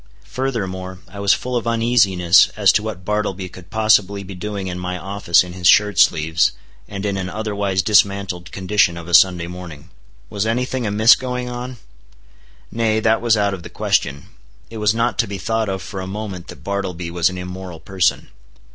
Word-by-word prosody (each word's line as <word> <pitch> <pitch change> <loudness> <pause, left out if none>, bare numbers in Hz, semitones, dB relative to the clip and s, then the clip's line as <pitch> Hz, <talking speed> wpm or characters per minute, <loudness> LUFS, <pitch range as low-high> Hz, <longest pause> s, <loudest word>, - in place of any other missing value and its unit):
Furthermore, 95 -8 -4
I 95 +3 -11
was 100 -1 +3
full 125 0 -5
of 120 -1 -2
uneasiness 105 -7 +4
as 100 -3 +5
to - - +1
what 105 -4 -6
Bartleby 100 -3 -2
could 90 -1 -14
possibly 105 -2 +2
be 95 +1 -9
doing 100 +1 -5
in 90 -1 -5
my 90 0 -4
office 95 -2 +2
in 90 -1 -9
his 90 -1 -1
shirt 105 -1 +4
sleeves, 80 +2 +3 0.3
and 100 0 -6
in 100 -1 -1
an 95 -1 -3
otherwise 100 -3 -2
dismantled 100 -3 +1
condition 95 -2 +1
of 85 -1 -9
a 85 - -7
Sunday 90 -1 +5
morning. 85 -2 -10 0.4
Was 105 +1 -2
any 125 +3 0
thing 130 -3 -3
amiss 110 +3 +6
going 125 -1 -3
on? 125 +1 -6 0.9
Nay, 110 -1 +1
that 110 0 +2
was 115 -2 +3
out 100 -1 +1
of 95 - -6
the - - -10
question. 70 0 -1 0.5
It 115 - -7
was 105 +1 +2
not 115 +1 0
to 115 - +2
be 100 0 -5
thought 110 0 -1
of 95 -1 -4
for 95 -3 -6
a 95 - -6
moment 95 -3 -6
that - - -12
Bartleby 90 -4 -4
was 85 +1 +2
an 90 - -7
immoral 90 -1 -7
person. 95 -1 -1
100 Hz, 190 wpm, -20 LUFS, 90-110 Hz, 0.9 s, amiss